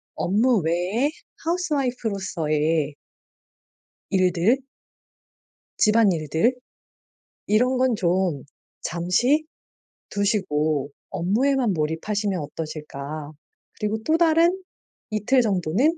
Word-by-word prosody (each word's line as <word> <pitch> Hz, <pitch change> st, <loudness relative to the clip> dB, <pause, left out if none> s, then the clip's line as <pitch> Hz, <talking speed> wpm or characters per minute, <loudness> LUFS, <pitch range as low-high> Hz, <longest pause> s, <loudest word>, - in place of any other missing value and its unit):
업무 220 Hz, +4 st, +2 dB
외에 180 Hz, -, 0 dB, 0.3 s
하우스 340 Hz, -1 st, -1 dB
와이프 250 Hz, -4 st, -1 dB
로서의 155 Hz, -5 st, -1 dB, 1.2 s
일들 185 Hz, +5 st, +3 dB, 1.2 s
집안일들. 210 Hz, -, +3 dB, 0.9 s
이런 250 Hz, +5 st, +3 dB
건 255 Hz, -2 st, +2 dB
좀 175 Hz, -6 st, 0 dB, 0.4 s
잠시 240 Hz, -, +1 dB, 0.6 s
두시고 155 Hz, -8 st, 0 dB, 0.2 s
업무에만 240 Hz, +6 st, +1 dB
몰입하시면 185 Hz, +6 st, -1 dB
어떠실까? 150 Hz, -1 st, -6 dB, 0.5 s
그리고 210 Hz, +1 st, -1 dB
또 315 Hz, +1 st, +3 dB
다른 340 Hz, +3 st, +3 dB, 0.5 s
이틀 215 Hz, +5 st, +2 dB
정도는 215 Hz, -, +1 dB
200 Hz, 195 characters per minute, -24 LUFS, 160-250 Hz, 1.2 s, 일들